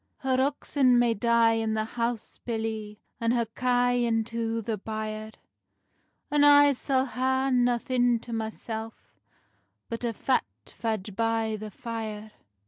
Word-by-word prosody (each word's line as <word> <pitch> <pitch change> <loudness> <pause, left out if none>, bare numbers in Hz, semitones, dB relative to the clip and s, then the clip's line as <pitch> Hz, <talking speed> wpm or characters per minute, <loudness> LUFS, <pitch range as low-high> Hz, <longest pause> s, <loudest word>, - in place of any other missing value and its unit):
"Her 260 -1 +1
oxen 270 -2 +2
may 240 -1 +3
dye 230 0 +3
i' - - -1
the 220 0 0
house, 235 0 -3
billie, 220 -2 -4 0.2
And 230 0 +1
her 235 -1 +1
kye 245 +1 +1
into 230 0 -1
the 225 0 -2
byre; 215 +1 -5 1.0
And 295 0 +4
I 290 0 +7
sall 265 0 0
hae 260 +1 0
nothing 245 -1 +2
to 235 - -8
mysell 220 0 -4 1.0
Bot 230 +1 -4
a 235 - 0
fat 260 +4 +1 0.2
fadge 215 -3 -4
by 225 -1 0
the 215 0 -7
fyre." 220 -1 -6
230 Hz, 135 wpm, -27 LUFS, 220-245 Hz, 1.0 s, I